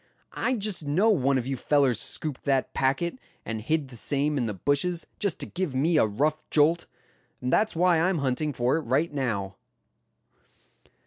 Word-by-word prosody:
I 260 Hz, -, 0 dB
just 205 Hz, -6 st, -3 dB
know 180 Hz, +10 st, +3 dB
one 140 Hz, -8 st, +2 dB
of 125 Hz, -, -2 dB
you 135 Hz, +1 st, -2 dB
fellers 135 Hz, -3 st, +2 dB
scooped 150 Hz, +3 st, -3 dB
that 135 Hz, -2 st, +1 dB
packet, 140 Hz, -, 0 dB, 0.3 s
and 110 Hz, 0 st, -4 dB
hid 150 Hz, +3 st, -1 dB
the 125 Hz, -, -11 dB
same 145 Hz, +5 st, 0 dB
in 125 Hz, -5 st, 0 dB
the 105 Hz, -, -2 dB
bushes, 145 Hz, -, 0 dB
just 200 Hz, -5 st, 0 dB
to -, -, -2 dB
give 180 Hz, -7 st, -3 dB
me 155 Hz, +5 st, +2 dB
a 110 Hz, -, +4 dB
rough 150 Hz, +9 st, -1 dB
jolt. 160 Hz, +3 st, +3 dB, 0.5 s
And 125 Hz, +1 st, -2 dB
that's 215 Hz, -, +2 dB
why 175 Hz, 0 st, +3 dB
I'm 185 Hz, +1 st, +2 dB
hunting 140 Hz, +2 st, -1 dB
for 125 Hz, +2 st, +1 dB
it -, -, -2 dB
right 145 Hz, +5 st, 0 dB
now." 100 Hz, -9 st, -2 dB
145 Hz, 180 wpm, -26 LUFS, 130-165 Hz, 0.5 s, a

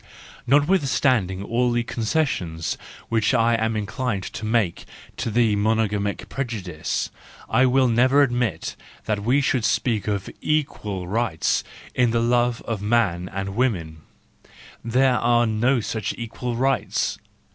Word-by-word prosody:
— -, -, -20 dB
Notwithstanding 130 Hz, -, +2 dB
all 120 Hz, +3 st, +1 dB
the 120 Hz, 0 st, +1 dB
concessions 110 Hz, -, -1 dB, 0.3 s
which 115 Hz, +2 st, +2 dB
I 115 Hz, 0 st, +3 dB
am 110 Hz, 0 st, 0 dB
inclined 105 Hz, 0 st, -2 dB
to 110 Hz, -, -5 dB
make 110 Hz, -6 st, 0 dB, 0.3 s
to -, -, -2 dB
the 115 Hz, -1 st, +3 dB
monogamic 105 Hz, -1 st, 0 dB
prejudice, 105 Hz, -, -3 dB, 0.4 s
1 130 Hz, +3 st, +4 dB
will 130 Hz, 0 st, +4 dB
never 130 Hz, +5 st, +4 dB
admit 120 Hz, -5 st, -1 dB, 0.3 s
that 105 Hz, -2 st, -1 dB
we 130 Hz, +6 st, +3 dB
should 130 Hz, -3 st, +1 dB
speak 110 Hz, 0 st, 0 dB
of 100 Hz, -2 st, -1 dB
equal 105 Hz, -11 st, -1 dB
rights 110 Hz, -4 st, 0 dB, 0.3 s
in 125 Hz, -1 st, +3 dB
the 115 Hz, +1 st, +1 dB
love 120 Hz, 0 st, +1 dB
of 110 Hz, -4 st, -3 dB
man 100 Hz, -5 st, +1 dB
and 95 Hz, 0 st, -4 dB
woman: 90 Hz, -11 st, 0 dB, 0.9 s
there 125 Hz, +2 st, +3 dB
are 120 Hz, 0 st, +3 dB
no 120 Hz, +4 st, +2 dB
such 110 Hz, -1 st, -3 dB
equal 120 Hz, +1 st, -4 dB
rights. 135 Hz, +2 st, 0 dB
115 Hz, 135 wpm, -23 LUFS, 105-125 Hz, 0.9 s, 1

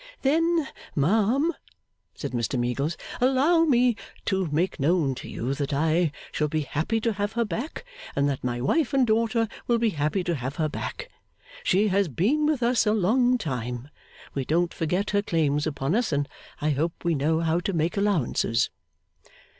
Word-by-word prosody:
'Then, 325 Hz, +2 st, +2 dB, 0.3 s
ma'am,' 225 Hz, -, +2 dB, 0.6 s
said 140 Hz, -, -5 dB
Mr 120 Hz, +2 st, -1 dB
Meagles, 140 Hz, +6 st, -1 dB, 0.2 s
'allow 280 Hz, +7 st, +4 dB
me 250 Hz, -5 st, +4 dB, 0.3 s
to 190 Hz, -3 st, 0 dB
make 160 Hz, +4 st, -1 dB
known 150 Hz, -1 st, +2 dB
to -, -, -8 dB
you 125 Hz, +4 st, -2 dB
that 140 Hz, 0 st, -3 dB
I 160 Hz, +3 st, +2 dB, 0.2 s
shall 150 Hz, -, 0 dB
be 155 Hz, +1 st, -1 dB
happy 155 Hz, +10 st, -1 dB
to 230 Hz, 0 st, +1 dB
have 205 Hz, +1 st, -2 dB
her 235 Hz, 0 st, +1 dB
back, 235 Hz, -, -5 dB, 0.3 s
and 140 Hz, 0 st, +2 dB
that 140 Hz, -2 st, -2 dB
my 120 Hz, -1 st, -1 dB
wife 285 Hz, -, +1 dB
and 265 Hz, -2 st, +4 dB
daughter 225 Hz, 0 st, +2 dB, 0.2 s
will 235 Hz, -, +3 dB
be 230 Hz, -1 st, +2 dB
happy 155 Hz, +4 st, 0 dB
to 175 Hz, -, -1 dB
have 130 Hz, -1 st, -4 dB
her 155 Hz, 0 st, 0 dB
back. -, -, -5 dB, 0.5 s
She 200 Hz, +3 st, +3 dB
has 195 Hz, 0 st, +2 dB
been 235 Hz, -, +1 dB
with 295 Hz, -5 st, +1 dB
us 235 Hz, -1 st, +3 dB
a 210 Hz, -, +4 dB
long 245 Hz, +5 st, +3 dB
time: 125 Hz, -, -4 dB, 0.4 s
we 135 Hz, -, -1 dB
don't 170 Hz, +5 st, +1 dB
forget 180 Hz, +6 st, -1 dB
her 205 Hz, 0 st, +2 dB
claims 150 Hz, -5 st, +1 dB
upon 140 Hz, 0 st, -1 dB
us, 235 Hz, -1 st, +1 dB
and 145 Hz, -1 st, 0 dB, 0.3 s
I 155 Hz, +1 st, +1 dB
hope 160 Hz, +4 st, -2 dB
we 170 Hz, -1 st, +2 dB
know 160 Hz, +3 st, +1 dB
how 165 Hz, +1 st, +1 dB
to 185 Hz, -, -2 dB
make 165 Hz, -1 st, 0 dB
allowances. 190 Hz, -, +1 dB
175 Hz, 180 wpm, -26 LUFS, 145-230 Hz, 0.6 s, allow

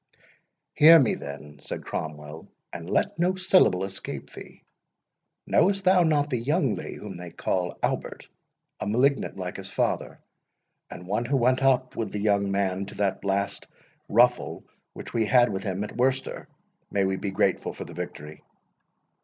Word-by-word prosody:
"Hear 165 Hz, +2 st, +9 dB
me, 130 Hz, -, +3 dB
then," 70 Hz, +1 st, -8 dB
said -, -, -7 dB
Cromwell, 75 Hz, 0 st, -6 dB, 0.3 s
"and 85 Hz, 0 st, -7 dB
let -, -, 0 dB
no 180 Hz, +2 st, +2 dB
syllable 185 Hz, -, +3 dB
escape 95 Hz, 0 st, -6 dB
thee. -, -, -12 dB, 0.8 s
Knowest 195 Hz, 0 st, +2 dB
thou 185 Hz, 0 st, +5 dB
not 150 Hz, -3 st, +2 dB
the 125 Hz, -, 0 dB
young 135 Hz, -, +1 dB
Lee, -, -, -6 dB
whom 100 Hz, -4 st, -8 dB
they 90 Hz, 0 st, -8 dB
call 90 Hz, +1 st, -2 dB
Albert, -, -, -2 dB, 0.5 s
a -, -, -3 dB
malignant 130 Hz, +2 st, +1 dB
like 90 Hz, -1 st, -5 dB
his 95 Hz, 0 st, -7 dB
father, -, -, -2 dB, 0.7 s
and 90 Hz, 0 st, -9 dB
one 105 Hz, +6 st, -1 dB
who 135 Hz, +3 st, +1 dB
went 130 Hz, +1 st, +2 dB
up 130 Hz, -1 st, +2 dB
with 115 Hz, -, -3 dB
the 105 Hz, -, -3 dB
young 100 Hz, -1 st, +1 dB
Man 95 Hz, -1 st, -1 dB
to -, -, -10 dB
that 100 Hz, -2 st, -1 dB
last 100 Hz, 0 st, -1 dB, 0.4 s
ruffle 125 Hz, +3 st, +2 dB, 0.3 s
which -, -, -9 dB
we 115 Hz, -2 st, +1 dB
had 125 Hz, 0 st, +4 dB
with 95 Hz, -, -3 dB
him 95 Hz, 0 st, -3 dB
at 105 Hz, -, -7 dB
Worcester—May 125 Hz, -5 st, -2 dB
we 95 Hz, 0 st, 0 dB
be 100 Hz, -, -3 dB
grateful 95 Hz, -, 0 dB
for -, -, -8 dB
the -, -, -10 dB
victory!" 75 Hz, +1 st, -8 dB
105 Hz, 160 wpm, -26 LUFS, 95-130 Hz, 0.8 s, Hear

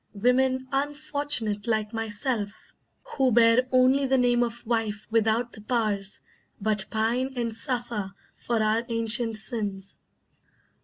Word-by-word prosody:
Women, 260 Hz, +4 st, +2 dB
unfortunate 285 Hz, -6 st, -1 dB
like 215 Hz, -1 st, 0 dB
myself, 220 Hz, -1 st, -3 dB, 0.3 s
who 265 Hz, -2 st, 0 dB
bear 235 Hz, +2 st, +5 dB
Only 260 Hz, +2 st, +4 dB
the 265 Hz, 0 st, +3 dB
name 245 Hz, -1 st, +3 dB
of 235 Hz, 0 st, -3 dB
wife 220 Hz, -3 st, -1 dB
without 225 Hz, +1 st, +1 dB
the 215 Hz, -, -11 dB
powers, 210 Hz, -4 st, -1 dB, 0.4 s
But 210 Hz, -1 st, +1 dB
pine 235 Hz, +4 st, 0 dB
and 230 Hz, -2 st, -2 dB
suffer 230 Hz, -5 st, -3 dB, 0.2 s
for 230 Hz, -2 st, -1 dB
our 215 Hz, +2 st, +1 dB
ancient 230 Hz, 0 st, +1 dB
sins. 205 Hz, -4 st, 0 dB
230 Hz, 120 wpm, -26 LUFS, 215-255 Hz, 0.4 s, bear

